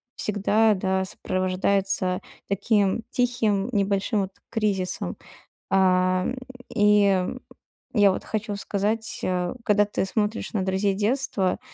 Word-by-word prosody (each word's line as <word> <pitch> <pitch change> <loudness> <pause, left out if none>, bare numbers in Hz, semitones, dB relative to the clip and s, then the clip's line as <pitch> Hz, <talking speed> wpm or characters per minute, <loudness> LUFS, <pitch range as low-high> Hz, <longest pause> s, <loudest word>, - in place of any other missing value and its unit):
всегда, 210 +1 +2
да, 190 0 0
сопровождается 185 0 0 0.3
таким 200 +1 +1
тихим 235 -4 0
небольшим 200 0 +1
вот 190 0 -4 0.2
кризисом. 195 - -1 0.5
А, 185 -1 +3 0.5
и 205 -3 +4 0.7
я 205 -3 +6
вот - - -4
хочу 215 -1 -3
сказать, 215 +3 -1
э, 180 -1 -1
когда 210 -1 +3
ты 205 - -2
смотришь 210 +2 -1
на 195 - 0
друзей 190 +1 +1
детства, 210 -3 0
200 Hz, 105 wpm, -25 LUFS, 190-210 Hz, 0.7 s, я